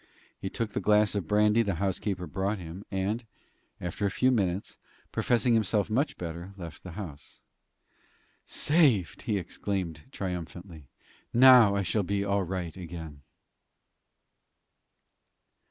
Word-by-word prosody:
He 95 - -4
took 110 +2 -3
the - - -2
glass 105 0 +3
of 100 -6 -2
brandy 105 +2 +4
the 100 -5 0
housekeeper 95 +1 -2
brought 95 +7 -2
him, 90 +2 -8
and, 100 +5 -1 0.6
after 90 +4 -4
a 100 - +3
few 130 +6 +2
minutes, 95 -5 -1 0.3
professing 120 0 +2
himself 110 -1 +1
much 140 +6 0
better, 85 +2 -6
left 85 -4 -8
the 90 - -9
house. 80 -7 -9 1.0
"Saved!" 140 - +2
he 110 -5 -1
exclaimed, 90 -3 -3
triumphantly. 90 - -6 0.5
"Now 125 -5 +8
I 100 - +1
shall 105 +4 +1
be 100 +1 -1
all 100 0 +1
right 90 -3 -4
again." 80 -5 -8
100 Hz, 125 wpm, -29 LUFS, 90-105 Hz, 1.0 s, Now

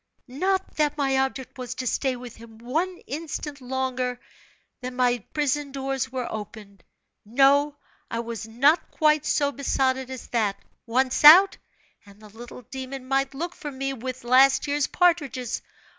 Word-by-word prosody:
Not 375 +9 -2
that 300 -1 +1
my 270 -2 +1
object 265 -1 -3
was 250 -1 -5
to 255 - -5
stay 260 +1 0
with 245 -1 -10
him 225 -1 -14
one 320 +11 -2
instant 295 0 -6
longer 255 -1 -2 0.6
her 250 - -4
my 250 -1 +1
prison 290 -1 -1
doors 270 -1 -3
were 255 -2 -3
opened; 205 -3 -9 0.4
no, 280 +5 +3 0.3
I 230 - -3
was 230 -2 -6
not 280 +9 +2
quite 305 -1 +2
so 285 -1 +1
besotted 265 -2 0
as 260 -1 -7
that 215 -4 0 0.3
once 255 +4 +1
out, 360 +7 +9 0.5
and 200 -1 -18
the 215 -1 -14
little 240 +3 -11
demon 265 +1 -7
might 270 0 0
look 345 +5 -4
for 295 - -7
me 270 0 -3
with 255 0 -6
last 265 +3 +5
year's 290 -1 0
partridges. 290 -9 0
265 Hz, 155 wpm, -25 LUFS, 245-285 Hz, 0.6 s, out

